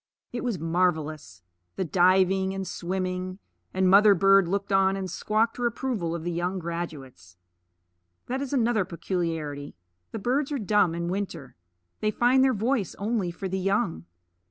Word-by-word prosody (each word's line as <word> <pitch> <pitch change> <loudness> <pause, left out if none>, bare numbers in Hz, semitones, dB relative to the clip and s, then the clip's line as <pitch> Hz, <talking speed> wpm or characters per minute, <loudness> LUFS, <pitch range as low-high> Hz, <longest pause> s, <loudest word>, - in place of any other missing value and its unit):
It 240 - -3
was 240 -6 -1
marvelous, 155 - -1 0.3
the 190 - -2
diving 190 +2 +3
and 190 -1 -4
swimming; 185 0 -3 0.3
and 190 0 +1
mother 200 +2 +7
bird 195 0 +5
looked 200 +2 -2
on 195 0 +4
and 190 -1 -3 0.2
quacked 220 +2 +2
her 245 -1 +1
approval 230 -8 -2
of 165 - -5
the 175 - -2
young 175 +3 -2
graduates. 150 - -7 0.9
That 260 +2 -3
is 280 - -4
another 240 -6 +2
peculiarity: 165 -5 -4 0.4
the - - -4
birds 265 +7 0
are 290 - 0
dumb 205 -6 +2
in 170 0 -3
winter; 180 -7 -4 0.4
they 215 - +1
find 245 +4 +3
their 260 -2 +3
voice 225 -1 -1
only 205 -3 -1
for 185 +3 -5
the 190 +1 -2
young. 185 - 0
190 Hz, 155 wpm, -26 LUFS, 170-215 Hz, 0.9 s, mother